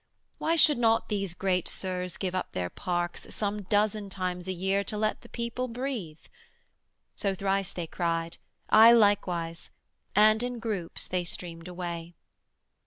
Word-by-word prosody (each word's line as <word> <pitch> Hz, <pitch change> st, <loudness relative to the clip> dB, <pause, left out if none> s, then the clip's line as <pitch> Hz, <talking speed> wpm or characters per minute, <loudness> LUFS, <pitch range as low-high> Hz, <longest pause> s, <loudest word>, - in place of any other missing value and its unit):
Why 330 Hz, -, +1 dB
should 300 Hz, -5 st, +6 dB
not 225 Hz, -1 st, +2 dB
these 195 Hz, -5 st, -1 dB
great 185 Hz, -2 st, 0 dB
Sirs 180 Hz, -2 st, -3 dB
Give 185 Hz, -2 st, -2 dB
up 185 Hz, -, -3 dB
their 90 Hz, -1 st, -2 dB
parks 175 Hz, -2 st, -3 dB
some 210 Hz, 0 st, -2 dB
dozen 205 Hz, +1 st, 0 dB
times 180 Hz, -1 st, -3 dB
a -, -, -1 dB
year 190 Hz, +2 st, 0 dB
To 210 Hz, -, -5 dB
let 215 Hz, 0 st, 0 dB
the 235 Hz, -, -15 dB
people 235 Hz, +2 st, -3 dB
breathe? 230 Hz, -, -4 dB, 0.9 s
So 195 Hz, -2 st, -1 dB
thrice 195 Hz, 0 st, 0 dB
they 175 Hz, -, -4 dB
cried, 165 Hz, 0 st, -2 dB, 0.3 s
I 225 Hz, +2 st, +8 dB
likewise, 180 Hz, -7 st, +2 dB, 0.5 s
and 215 Hz, +2 st, +6 dB
in 245 Hz, 0 st, -2 dB
groups 210 Hz, -7 st, -1 dB
they 180 Hz, -1 st, -1 dB
streamed 170 Hz, 0 st, -5 dB
away. 175 Hz, -1 st, -6 dB
195 Hz, 150 wpm, -28 LUFS, 175-215 Hz, 0.9 s, I